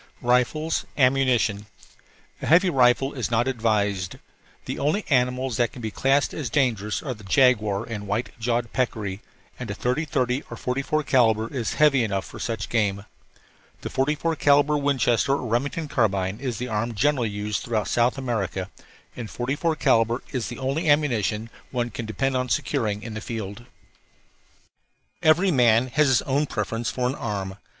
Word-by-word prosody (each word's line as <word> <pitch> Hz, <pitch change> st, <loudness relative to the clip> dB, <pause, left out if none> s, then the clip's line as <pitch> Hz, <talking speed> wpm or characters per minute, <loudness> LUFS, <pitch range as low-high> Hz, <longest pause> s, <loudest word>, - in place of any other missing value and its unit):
RIFLES 125 Hz, +6 st, +1 dB
AMMUNITION 125 Hz, -6 st, +2 dB, 0.7 s
A -, -, -4 dB
heavy 180 Hz, +3 st, +5 dB
rifle 130 Hz, +1 st, +3 dB
is 125 Hz, -5 st, -3 dB
not 120 Hz, +2 st, +1 dB
advised. 105 Hz, -6 st, 0 dB, 0.5 s
The -, -, -4 dB
only 155 Hz, +9 st, 0 dB
animals 125 Hz, -1 st, +1 dB
that 120 Hz, -2 st, +1 dB
can 135 Hz, -, -11 dB
be 110 Hz, -, -3 dB
classed 135 Hz, +5 st, +1 dB
as 145 Hz, -7 st, -4 dB
dangerous 110 Hz, -5 st, 0 dB
are 135 Hz, -5 st, -3 dB
the 110 Hz, -3 st, -14 dB
jaguar 105 Hz, -2 st, +3 dB
and 110 Hz, -3 st, -6 dB
white 105 Hz, +5 st, -2 dB
jawed 120 Hz, 0 st, -1 dB
peccary, 105 Hz, -6 st, -2 dB, 0.4 s
and 125 Hz, -3 st, -6 dB
a 100 Hz, -, -3 dB
30 125 Hz, +8 st, -1 dB
30 130 Hz, -2 st, 0 dB
or -, -, -7 dB
44 140 Hz, +4 st, -1 dB
calibre 115 Hz, -5 st, +3 dB
is 120 Hz, -4 st, -2 dB
heavy 145 Hz, -4 st, +4 dB
enough 100 Hz, -3 st, -2 dB
for -, -, -10 dB
such 115 Hz, -1 st, -3 dB
game. 100 Hz, -3 st, 0 dB, 0.8 s
The -, -, -6 dB
44 150 Hz, +4 st, 0 dB
calibre 145 Hz, +1 st, +4 dB
Winchester 135 Hz, -3 st, +2 dB
or 140 Hz, -, -2 dB
Remington 140 Hz, +7 st, -1 dB
carbine 100 Hz, -6 st, 0 dB
is 125 Hz, -5 st, -3 dB
the 125 Hz, -, -4 dB
arm 115 Hz, +1 st, -2 dB
generally 130 Hz, -1 st, +1 dB
used 105 Hz, +1 st, -3 dB
throughout 110 Hz, -4 st, -1 dB
South 120 Hz, +3 st, +2 dB
America, 100 Hz, -7 st, -3 dB, 0.4 s
and 115 Hz, -3 st, -6 dB
44 145 Hz, +6 st, -1 dB
calibre 115 Hz, -6 st, +2 dB
is 125 Hz, -4 st, -2 dB
the 120 Hz, -, -7 dB
only 140 Hz, +5 st, -1 dB
ammunition 120 Hz, -8 st, +2 dB
that 115 Hz, -, -13 dB, 0.2 s
one 120 Hz, -2 st, -2 dB
can 115 Hz, +1 st, -6 dB
depend 135 Hz, +5 st, -1 dB
upon 125 Hz, 0 st, -1 dB
securing 105 Hz, -3 st, -1 dB
in 115 Hz, -, -6 dB
the 110 Hz, -, -5 dB
field. 110 Hz, -1 st, -6 dB, 1.6 s
Every 175 Hz, +5 st, +4 dB
man 120 Hz, -3 st, +4 dB
has 150 Hz, +3 st, +3 dB
his 130 Hz, -3 st, +3 dB
own 140 Hz, +2 st, 0 dB
preference 115 Hz, +1 st, -2 dB
for 125 Hz, -1 st, -1 dB
an 125 Hz, -, -1 dB
arm. 100 Hz, -6 st, -4 dB
120 Hz, 165 wpm, -24 LUFS, 110-135 Hz, 1.6 s, heavy